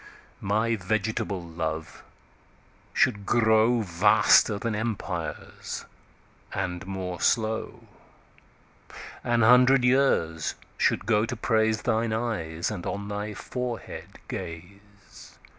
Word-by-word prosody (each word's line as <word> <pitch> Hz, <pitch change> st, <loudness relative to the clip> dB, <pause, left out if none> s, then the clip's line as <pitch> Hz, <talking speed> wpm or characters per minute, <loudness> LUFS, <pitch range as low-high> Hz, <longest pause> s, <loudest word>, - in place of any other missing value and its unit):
My 110 Hz, +4 st, +1 dB
vegetable 110 Hz, -1 st, -2 dB
Love 80 Hz, -1 st, -5 dB, 0.9 s
should 105 Hz, -6 st, +2 dB
growVaster 110 Hz, -3 st, +4 dB
then 115 Hz, +1 st, -2 dB
Empires, 110 Hz, 0 st, -4 dB, 0.7 s
and 95 Hz, 0 st, -3 dB
more 95 Hz, -2 st, -5 dB
slow. 110 Hz, -1 st, 0 dB, 1.4 s
An 120 Hz, -1 st, +2 dB
hundred 125 Hz, +3 st, +6 dB
years 125 Hz, -, +2 dB, 0.2 s
should -, -, +1 dB
go 110 Hz, 0 st, +2 dB
to 120 Hz, -, -3 dB
praiseThine 110 Hz, 0 st, +1 dB
Eyes, 105 Hz, -8 st, -2 dB
and 95 Hz, -5 st, -5 dB
on 100 Hz, 0 st, -4 dB
thy 105 Hz, 0 st, -4 dB
Forehead 125 Hz, 0 st, -6 dB
Gaze. 100 Hz, +4 st, -10 dB
105 Hz, 90 wpm, -26 LUFS, 95-115 Hz, 1.4 s, hundred